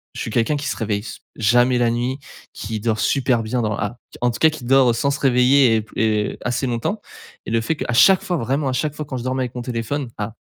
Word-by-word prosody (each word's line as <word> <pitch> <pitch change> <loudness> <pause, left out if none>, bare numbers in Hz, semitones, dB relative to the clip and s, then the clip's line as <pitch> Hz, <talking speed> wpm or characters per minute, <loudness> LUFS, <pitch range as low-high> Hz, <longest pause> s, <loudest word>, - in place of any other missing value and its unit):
je - - -5
suis - - -4
quelqu'un 120 +6 +1
qui 145 - -4
se - - -2
réveille 105 -2 -1
s 110 - -9 0.2
jamais 120 +3 +3
la 120 -1 +3
nuit, 120 +3 -2 0.4
qui 110 +1 -5
dort 110 0 -1
super 130 -4 +1
bien 120 +3 -1
dans 105 -1 -1
la 105 +3 -3 0.2
en 120 0 +2
tout 115 - -7
cas 160 - +6
qui 155 -5 -8
dort 130 -2 +4
sans 140 +4 0
se 140 - -3
réveiller 125 -1 +4
et - - 0
p 110 - -17
et 105 -2 0
assez 125 +2 -1
longtemps, 120 - -2 0.4
et - - -5
le 115 - +2
fait 160 +8 -1
qu'à 120 - -3
chaque 185 +11 +6
fois, 180 - -1
vraiment 135 +2 -1
à - - -2
chaque 150 +3 -1
fois, 150 - -5
quand 135 -2 -5
je 120 - -5
dormais 130 +1 -1
avec 125 0 -6
mon 125 - -4
téléphone 120 +3 -3
à 105 +1 -4
125 Hz, 265 wpm, -21 LUFS, 115-135 Hz, 0.4 s, cas